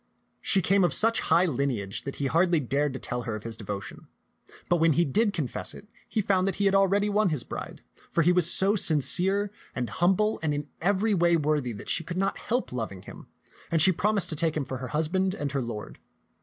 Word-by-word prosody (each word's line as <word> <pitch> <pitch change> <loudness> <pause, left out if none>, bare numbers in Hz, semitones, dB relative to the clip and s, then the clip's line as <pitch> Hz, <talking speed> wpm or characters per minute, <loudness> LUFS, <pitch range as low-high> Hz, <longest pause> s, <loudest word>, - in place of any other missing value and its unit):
She 190 -3 +2
came 195 +2 +3
of 175 - +3
such 230 +1 +4
high 170 +3 +3
lineage 130 - -2
that 140 - -5
he 140 - -3
hardly 170 +4 +2
dared 140 +2 -1
to 130 - -6
tell 125 0 -4
her 115 -2 -4
of 105 - -8
his 115 -1 -5
devotion; 100 -2 -7 0.6
but 175 - +2
when 165 -1 +3
he 170 +4 +2
did 210 - +1
confess 155 - -4
it, 205 - -13 0.2
he 220 -3 -1
found 190 -1 +1
that 195 - -1
he 200 - -1
had 195 - +3
already 195 +1 +3
won 210 -1 +2
his 150 -6 -1
bride, - - -8 0.3
for 165 - +1
he 175 - +4
was 180 -2 +2
so 195 +2 +3
sincere 190 +4 +2 0.2
and 125 -4 -3
humble 195 - +1
and 150 -2 -1
in 145 0 -4
every 200 +4 +1
way 170 -2 +3
worthy 150 -4 0
that 100 - -10
she 165 - +1
could 175 +2 -6
not 195 +1 -1
help 245 +3 -2
loving 110 -6 -5
him, - - -12 0.4
and 165 - +1
she 185 +4 +6
promised 200 0 0
to 155 - -1
take 160 0 0
him 145 - -2
for 130 0 -5
her 130 +1 -6
husband 185 +6 0
and 145 -6 -3
her 135 -1 -1
lord. 115 -3 -7
165 Hz, 225 wpm, -27 LUFS, 140-195 Hz, 0.6 s, she